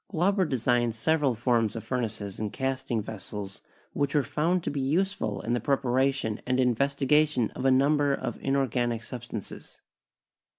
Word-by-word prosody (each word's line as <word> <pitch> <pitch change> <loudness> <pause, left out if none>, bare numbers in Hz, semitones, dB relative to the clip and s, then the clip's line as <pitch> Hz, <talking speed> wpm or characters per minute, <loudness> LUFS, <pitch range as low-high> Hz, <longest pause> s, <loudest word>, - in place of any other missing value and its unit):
Glauber 190 +1 +2
designed 120 -4 +1
several 145 +1 +1
forms 115 -1 +1
of 115 - -5
furnaces 110 -6 -3
and 105 -1 -2
casting 130 -4 -2
vessels 105 -2 -7 0.3
which 145 +1 -1
were 145 - +4
found 170 +5 0
to - - -2
be 140 -1 -2
useful 150 - 0
in 120 - -2
the 120 - +1
preparation 130 -4 0
and 130 0 +1
investigation 140 +1 +2
of 130 - -5
a - - +6
number 140 +2 +3
of 130 -4 -3
inorganic 125 -4 0
substances. 120 -3 -8
130 Hz, 145 wpm, -28 LUFS, 115-140 Hz, 0.3 s, a